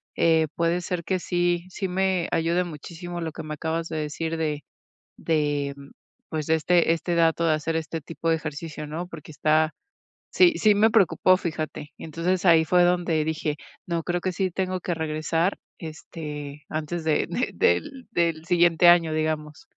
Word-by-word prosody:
eh, 160 Hz, -1 st, +3 dB
puede 170 Hz, +1 st, +1 dB
ser 175 Hz, -1 st, -3 dB
que 190 Hz, -, 0 dB
sí, 175 Hz, 0 st, 0 dB
sí 190 Hz, +1 st, -3 dB
me 185 Hz, -1 st, 0 dB
ayuda 170 Hz, +2 st, +1 dB
muchísimo 175 Hz, +2 st, -7 dB
lo 160 Hz, -1 st, -3 dB
que -, -, -8 dB
me 155 Hz, 0 st, -5 dB
acabas 160 Hz, +2 st, -2 dB
de 160 Hz, -, -4 dB
decir 160 Hz, +2 st, -3 dB
de 150 Hz, -2 st, -2 dB, 0.5 s
de, 145 Hz, -3 st, -1 dB, 0.5 s
pues, 155 Hz, -1 st, -3 dB
de 160 Hz, -, +4 dB
este 165 Hz, +1 st, +3 dB
este 170 Hz, +1 st, -2 dB
dato 165 Hz, 0 st, +3 dB
de 155 Hz, -, +4 dB
hacer 155 Hz, +1 st, -2 dB
este 160 Hz, 0 st, -3 dB
tipo 165 Hz, +3 st, -4 dB
de 165 Hz, -, +4 dB
ejercicio, 155 Hz, 0 st, -6 dB
¿no? 160 Hz, +4 st, -4 dB
Porque 155 Hz, -3 st, -10 dB
está 155 Hz, +1 st, +2 dB, 0.6 s
sí, 355 Hz, -2 st, +5 dB
sí 210 Hz, -1 st, +5 dB
me 220 Hz, +2 st, +4 dB
preocupó, 185 Hz, -3 st, +4 dB
fíjate. 155 Hz, -3 st, -5 dB
Entonces, 170 Hz, +4 st, -2 dB
ahí 165 Hz, -2 st, +5 dB
fue 180 Hz, +2 st, +4 dB
donde 175 Hz, -3 st, +1 dB
dije: 155 Hz, -1 st, -2 dB, 0.3 s
"No, 170 Hz, -1 st, -1 dB
creo 175 Hz, +1 st, -1 dB
que 185 Hz, 0 st, -2 dB
sí 190 Hz, 0 st, -1 dB
tengo 185 Hz, +1 st, -2 dB
que 175 Hz, -, -3 dB
regresar, 160 Hz, +3 st, -1 dB, 0.2 s
este, 150 Hz, -3 st, -8 dB
antes 160 Hz, +2 st, -3 dB
de 155 Hz, -1 st, +1 dB
de -, -, -1 dB
del 250 Hz, -, 0 dB
del 165 Hz, -3 st, 0 dB
siguiente 175 Hz, 0 st, +4 dB
año", 170 Hz, -2 st, +5 dB
digamos. 155 Hz, -, -3 dB
165 Hz, 175 wpm, -25 LUFS, 155-175 Hz, 0.6 s, sí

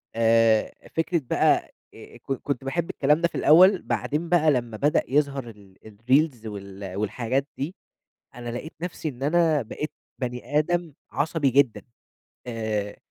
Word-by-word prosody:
آآ، 115 Hz, -1 st, +3 dB, 0.2 s
فكرة 165 Hz, +1 st, +1 dB
بقى، -, -, +2 dB, 0.2 s
آآ، -, -, -13 dB
ك -, -, -29 dB
كنت 135 Hz, 0 st, -4 dB
باحب 165 Hz, +5 st, -2 dB
الكلام 150 Hz, +3 st, +2 dB
ده 170 Hz, -, +4 dB
في -, -, -14 dB
الأول، 180 Hz, +6 st, +6 dB
بعدين 155 Hz, +3 st, -2 dB
بقى 160 Hz, -3 st, +4 dB
لمّا 120 Hz, -5 st, -2 dB
بدأ 145 Hz, +6 st, +2 dB
يظهر 140 Hz, -3 st, 0 dB
ال 100 Hz, -3 st, -16 dB
الReels 120 Hz, +4 st, +1 dB
وال 100 Hz, -2 st, -7 dB
والحاجات 120 Hz, +6 st, -1 dB
دي، 155 Hz, +8 st, -4 dB, 0.6 s
أنا 120 Hz, 0 st, -6 dB
لقيت 125 Hz, +7 st, -6 dB
نفْسِي 170 Hz, -2 st, -4 dB
إن 130 Hz, -1 st, -8 dB
أنا 160 Hz, 0 st, +3 dB
بقيت 150 Hz, +6 st, -5 dB, 0.3 s
بَنِي 125 Hz, +3 st, -3 dB
آدم 175 Hz, 0 st, -1 dB, 0.2 s
عصبي 150 Hz, -1 st, +1 dB
جدًا، 135 Hz, -2 st, +2 dB, 0.7 s
آآ، 110 Hz, -3 st, -3 dB
135 Hz, 145 wpm, -25 LUFS, 115-155 Hz, 0.7 s, الأول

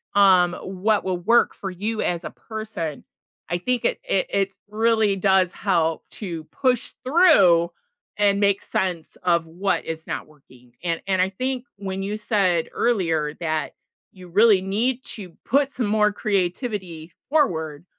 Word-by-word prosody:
um, 185 Hz, -3 st, +5 dB
what 200 Hz, +3 st, 0 dB
will 185 Hz, -1 st, -1 dB
work 225 Hz, +7 st, +3 dB
for 195 Hz, -, -5 dB
you 215 Hz, +4 st, -3 dB
as 175 Hz, -1 st, -1 dB
a -, -, -5 dB
person, 215 Hz, -9 st, -6 dB, 0.5 s
I 175 Hz, -, 0 dB
think 250 Hz, +7 st, -1 dB
it -, -, +1 dB
it -, -, 0 dB
it 195 Hz, 0 st, 0 dB, 0.2 s
really 220 Hz, -1 st, +2 dB
does 190 Hz, -2 st, +3 dB
help 165 Hz, -6 st, 0 dB
to 170 Hz, -6 st, -6 dB
push 250 Hz, -, -1 dB
through, 200 Hz, -, +5 dB, 0.5 s
and 200 Hz, -1 st, +3 dB
make 200 Hz, -1 st, +2 dB
sense 180 Hz, -4 st, -3 dB
of 170 Hz, -2 st, +2 dB
what 175 Hz, +1 st, -1 dB
is 160 Hz, 0 st, -5 dB
not -, -, -4 dB
working, 130 Hz, -5 st, -21 dB
and 170 Hz, -2 st, -1 dB
and 190 Hz, -1 st, +1 dB
I 185 Hz, -, +2 dB
think 255 Hz, +4 st, -3 dB
when 195 Hz, -1 st, -4 dB
you 205 Hz, +2 st, -3 dB
said 195 Hz, -6 st, +1 dB
earlier 165 Hz, -10 st, 0 dB
that 160 Hz, -2 st, -2 dB, 0.4 s
you 185 Hz, -2 st, -13 dB
really 205 Hz, +1 st, +5 dB
need 230 Hz, +7 st, -1 dB
to 195 Hz, -5 st, -8 dB
put 275 Hz, +2 st, +2 dB
some 245 Hz, -3 st, -1 dB
more 210 Hz, 0 st, +3 dB
creativity 185 Hz, -4 st, -2 dB, 0.2 s
forward, 160 Hz, -, 0 dB
195 Hz, 155 wpm, -23 LUFS, 175-220 Hz, 0.5 s, um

